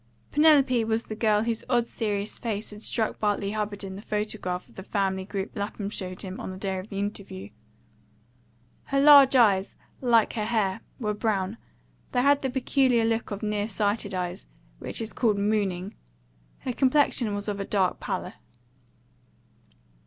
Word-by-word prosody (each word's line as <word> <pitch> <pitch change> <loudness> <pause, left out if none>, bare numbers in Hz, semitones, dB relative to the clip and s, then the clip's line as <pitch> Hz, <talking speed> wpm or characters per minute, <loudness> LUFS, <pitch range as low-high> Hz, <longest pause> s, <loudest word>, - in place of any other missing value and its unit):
Penelope 280 -6 +5
was 225 +1 0
the 215 - -6
girl 215 -1 +2
whose 230 -1 -1
odd 240 -2 +3
serious 205 -2 -2
face 220 -2 -3
had 210 0 -10
struck 220 -1 -1
Bartley 205 -2 0
Hubbard 210 -1 -3
in 190 -1 -6
the 200 - -8
photograph 210 -4 -3
of - - -21
the - - -8
family 190 -1 -1
group 195 0 -4
Lapham 205 -1 -4
showed 185 -3 -6
him 190 -1 -6
on - - -5
the 185 - -7
day 190 -1 -2
of 190 +4 -9
the 195 - -6
interview. 200 - -5 1.4
Her 275 - 0
large 280 -2 +8
eyes, 205 -6 +4 0.3
like 235 -4 +3
her 215 -2 -2
hair, 215 -3 0 0.2
were 210 -4 -1
brown; 210 -1 -1 0.6
they 245 -1 +2
had 285 +1 +4
the 265 - -1
peculiar 255 -2 +2
look 225 0 0
of 205 +1 -5
near 210 -1 -1
sighted 205 -1 -1
eyes 175 - -4 0.3
which - - -5
is 225 - -4
called 220 -5 +1
mooning; 200 -2 0 0.7
her 255 - -3
complexion 260 -5 +2
was 205 +1 -2
of 205 -1 -2
a - - -1
dark 190 -3 +1
pallor. - - -4
210 Hz, 165 wpm, -26 LUFS, 200-230 Hz, 1.4 s, large